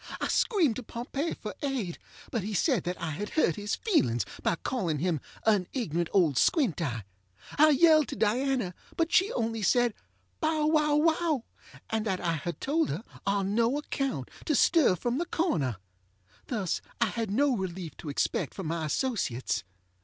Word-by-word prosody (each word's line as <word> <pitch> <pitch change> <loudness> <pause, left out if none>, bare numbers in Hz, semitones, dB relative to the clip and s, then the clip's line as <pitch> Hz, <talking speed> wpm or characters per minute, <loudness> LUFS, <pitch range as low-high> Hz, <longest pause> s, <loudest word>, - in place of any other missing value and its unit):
I - - -1
screamed 350 - +2
to - - -4
Pompey 260 +7 -4
for 210 - -6
aid; 255 -11 -2 0.3
but 230 - 0
he 205 +2 -4
said 255 - +2
that 180 +1 -3
I 160 - -3
had 205 +8 -4
hurt 240 - +2
his 205 0 -2
feelings 120 - +1 0.2
by - - +1
calling 175 -6 -2
him 160 -2 0 0.2
ŌĆ£an 205 -5 +3
ignorant 175 - -1
old 160 -9 +3
squint 250 - +2
eye. 120 -8 -2 0.5
ŌĆØ - - -10
I 310 +1 +8
yelled 310 0 +5
to - - -5
Diana; 235 -1 +1 0.2
but 330 0 +1
she 385 +4 +4
only 225 -2 -1
said 240 +4 +3 0.5
ŌĆ£bow 310 -1 +2
wow 300 -2 +3
wow, 315 +2 +4 0.3
ŌĆØ - - -23 0.2
and 220 0 0
that 190 -2 0
I 170 -2 0
had 165 +2 -4
told 310 +2 +1
her - - -3 0.2
ŌĆ£on 200 -1 +1
no 230 +6 +2
account 275 - -3
to 300 - +1
stir 315 - +5
from 240 - -1
the 345 - 0
corner. 155 - 0
ŌĆØ 95 0 -35
Thus 205 -8 -1 0.2
I 235 - +4
had 220 +1 -2
no 265 +5 +2
relief 185 -5 -5
to 155 - -7
expect 140 - -1
from 190 - -5
my 160 0 -2
associates. 155 - -1
215 Hz, 185 wpm, -29 LUFS, 170-280 Hz, 0.5 s, I